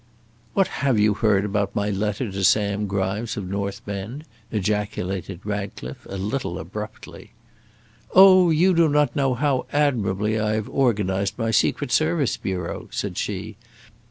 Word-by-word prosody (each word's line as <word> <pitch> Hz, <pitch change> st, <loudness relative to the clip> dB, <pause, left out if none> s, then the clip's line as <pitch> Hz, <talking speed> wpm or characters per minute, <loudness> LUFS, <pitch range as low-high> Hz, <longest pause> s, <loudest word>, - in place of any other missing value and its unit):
"What 195 Hz, -2 st, +3 dB
have 135 Hz, -5 st, +2 dB
you 105 Hz, 0 st, +4 dB
heard 105 Hz, -2 st, +2 dB
about 100 Hz, -1 st, -1 dB
my 105 Hz, 0 st, 0 dB
letter 105 Hz, +3 st, -2 dB
to 95 Hz, 0 st, -3 dB
Sam 105 Hz, +1 st, +2 dB
Grimes, 100 Hz, +3 st, -2 dB
of 100 Hz, -3 st, -4 dB
North 100 Hz, +1 st, -4 dB
Bend?" 105 Hz, +9 st, -6 dB, 0.3 s
ejaculated 95 Hz, -3 st, -2 dB
Ratcliffe, 100 Hz, -11 st, -5 dB
a 95 Hz, -, -5 dB
little 100 Hz, -2 st, -3 dB
abruptly. 105 Hz, +6 st, -8 dB, 0.8 s
"Oh, 185 Hz, -1 st, +8 dB
you 170 Hz, +4 st, +4 dB
do 165 Hz, -2 st, +4 dB
not 150 Hz, +1 st, +2 dB
know 135 Hz, -3 st, +1 dB
how 135 Hz, 0 st, 0 dB
admirably 110 Hz, -7 st, +1 dB
I 105 Hz, 0 st, 0 dB
have 110 Hz, -1 st, -2 dB
organised 100 Hz, -5 st, 0 dB
my 115 Hz, -2 st, -1 dB
secret 110 Hz, -, +1 dB
service 85 Hz, +2 st, +2 dB
bureau," 95 Hz, -1 st, -4 dB
said 100 Hz, -3 st, -4 dB
she. 105 Hz, +3 st, -4 dB
105 Hz, 145 wpm, -23 LUFS, 100-125 Hz, 0.8 s, Oh